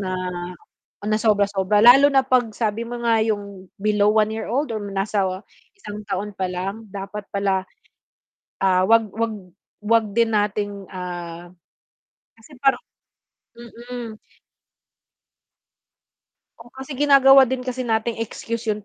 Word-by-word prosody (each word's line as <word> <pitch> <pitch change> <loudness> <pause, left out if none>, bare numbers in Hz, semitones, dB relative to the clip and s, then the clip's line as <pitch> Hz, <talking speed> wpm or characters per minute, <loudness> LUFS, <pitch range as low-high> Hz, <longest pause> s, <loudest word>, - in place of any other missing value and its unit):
na 185 -1 -3 0.9
na 215 +1 +1
sobra 210 -2 +3
sobra, 200 +1 +1
lalo 270 +4 +8
na 270 -2 +3
'pag 250 -3 +1
sabi 225 0 -1
mo 240 - -5
nga 230 -1 +3
yung 200 -3 -3
below 210 0 +2
one 215 0 +3
year 220 - -5
old 265 +3 -1
or 215 - -3
nasa 195 +1 0 0.5
isang 210 - -9
taon 200 +1 -3
pa 190 -1 -3
lang 195 +5 -5
dapat 200 +1 -7
pala, 195 -1 -1 0.9
ah, 185 -1 +3
'wag 225 +1 +4
'wag 225 0 -1 0.5
'wag 225 +1 +2
din 230 0 +2
nating, 205 -1 -1
ah. 175 -2 -7 0.9
kasi 225 +7 -17
parang 270 -1 +2 0.8
mm. 235 -1 -9 2.4
Oo, 235 +1 -15
kasi 265 +1 -8
ginagawa 275 -1 +6
din 260 0 -1
kasi 255 0 -3
nating 225 0 -1
excuse 230 +1 -6
yun 210 - -3
215 Hz, 130 wpm, -22 LUFS, 200-235 Hz, 2.4 s, lalo